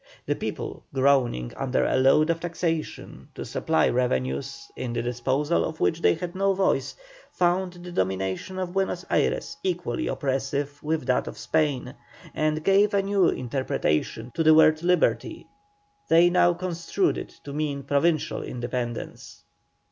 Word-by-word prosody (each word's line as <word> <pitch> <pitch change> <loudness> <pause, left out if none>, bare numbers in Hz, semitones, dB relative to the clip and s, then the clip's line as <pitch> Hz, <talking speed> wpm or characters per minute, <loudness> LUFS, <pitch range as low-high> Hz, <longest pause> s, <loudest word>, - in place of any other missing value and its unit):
The - - +1
people, - - -5
groaning 130 - +2
under 130 -1 0
a - - +1
load 135 +5 +4
of 165 - -2
taxation 165 -2 -4
to - - -6
supply 80 - +1
revenues 70 - -1
in 120 -2 -4
the 115 - -2
disposal 130 +6 0
of 160 0 -4
which 165 - +1
they - - +4
had 175 +1 -5
no 195 0 +1
voice, 190 0 0 0.4
found 180 +1 +1
the 175 0 -10
domination 95 - -2
of 185 -1 -3
Buenos 190 -2 -1
Ayres - - 0
equally 175 -10 -2
oppressive 140 +1 -2
with 155 -3 -2
that 125 - +1
of - - -7
Spain, 150 -5 0 0.4
and 155 0 0
gave 200 +2 +4
a 195 - +2
new 195 -2 +3
interpretation 120 - -2
to - - -1
the 155 -1 +6
word 155 0 +5
liberty: 180 +1 +1 0.6
they 170 +2 +5
now 175 -1 +4
construed 180 - -1
it - - -8
to 140 - -7
mean 145 -2 -2
provincial 150 +3 +1
independence. 120 -1 -5
155 Hz, 150 wpm, -25 LUFS, 130-175 Hz, 0.6 s, the